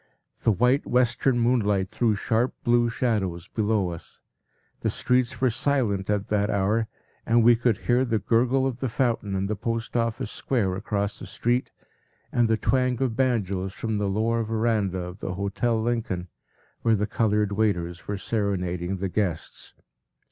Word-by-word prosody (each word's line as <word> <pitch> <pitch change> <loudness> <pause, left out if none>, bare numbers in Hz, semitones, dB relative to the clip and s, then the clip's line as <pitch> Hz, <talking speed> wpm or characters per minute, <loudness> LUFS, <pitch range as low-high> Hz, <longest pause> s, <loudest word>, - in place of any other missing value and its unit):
The 115 - +3
white, 125 +7 +2
western 125 +1 +2
moonlight 105 -6 +1
threw 115 -3 +1
sharp, 115 +4 0
blue 120 -1 +3
shadows 100 -8 -1
below 105 -4 0
us. 85 - -10 0.6
The - - 0
streets 125 +1 0
were 130 -2 +3
silent 115 -6 0
at 105 -1 0
that 105 0 +1
hour, 105 +3 +1 0.4
and 115 +1 +3
we 120 +1 +7
could 115 -2 +1
hear 125 +1 +3
the 115 -3 0
gurgle 120 +6 +2
of 130 -2 -2
the 130 - -1
fountain 115 -5 0
in 95 0 0
the 105 +2 -1
Post 115 +2 -3
Office 115 -2 -1
square 110 -8 0
across 100 +1 -2
the - - -8
street, 120 +2 -1 0.6
and 120 -2 +3
the 110 0 +2
twang 125 +2 +1
of 130 -4 0
banjos 100 -7 0
from 110 -1 -2
the 100 -1 0
lower 115 +3 +1
verandah 110 -4 0
of 90 +2 -8
the 90 - -4
Hotel 100 +4 0
Lincoln, 110 -6 -2 0.5
where 115 -1 +3
the 105 0 0
colored 105 -1 +1
waiters 90 -5 -1
were 105 - -2
serenading 95 -4 -2
the 95 +1 -2
guests. 90 -3 -3
110 Hz, 160 wpm, -25 LUFS, 100-120 Hz, 0.6 s, we